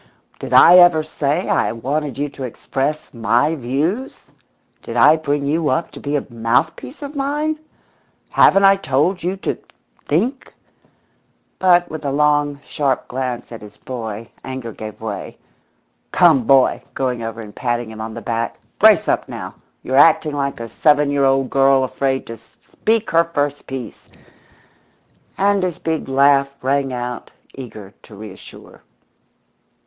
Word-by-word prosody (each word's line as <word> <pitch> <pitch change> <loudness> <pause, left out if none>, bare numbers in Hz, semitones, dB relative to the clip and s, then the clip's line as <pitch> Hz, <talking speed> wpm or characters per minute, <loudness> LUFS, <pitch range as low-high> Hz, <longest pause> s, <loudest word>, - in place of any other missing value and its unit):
"Did - - -7
I 180 - +8
ever 175 -3 +6
say 155 +2 -2
I - - +1
wanted 135 +4 -3
you 145 +1 -1
to 140 - -13
express 135 +4 -3
'my 120 +6 +1
views'? 155 - -3 0.5
Did - - -6
I 155 - +7
bring 145 -2 -2
you 155 +1 0
up 130 +6 -1
to - - -11
be 145 +1 -3
a 145 - -1
mouthpiece 120 - -2
of 285 +1 -7
mine? 295 +3 -1 0.7
Haven't 195 - +5
I 195 0 +6
told 175 +3 0
you 185 +3 -2
to - - -3 0.5
think?" 235 - -1 1.0
But 175 -2 +4
with 155 -1 -6
a 140 - -1
long, 145 0 +1
sharp 140 -3 -1
glance 125 -2 -4
at 115 - -9
his 105 -1 -13
boy 115 -3 -7
anger 130 -3 -6
gave 110 0 -9
way. 110 -2 -6 0.7
"Come, 160 -9 +4
boy" 135 +1 +4
going 125 -3 -2
over 115 0 -5
and 105 -2 -10
patting 120 -2 -2
him 110 0 -8
on 110 0 -6
the - - -8
back 115 0 -3 0.2
"brace - - +5
up - - 0
now. - - -7 0.3
You're 130 - -1
acting 155 0 +5
like 140 -2 -2
a 115 - -6
seven 145 +4 +2
year 140 -1 +2
old 135 -1 +1
girl 135 -1 +4
afraid 135 +1 -2
to 115 - -8
speak 115 - -3
her 165 0 +4
first 145 -3 -3
piece," 130 -4 -8 1.3
and 200 0 +2
his 180 -3 -2
big 160 -3 -3
laugh 140 0 +3
rang 135 0 0
out, 125 -1 -5 0.2
eager 110 -7 -10
to 105 - -15
reassure. 100 -2 -12
140 Hz, 155 wpm, -19 LUFS, 120-160 Hz, 1.3 s, I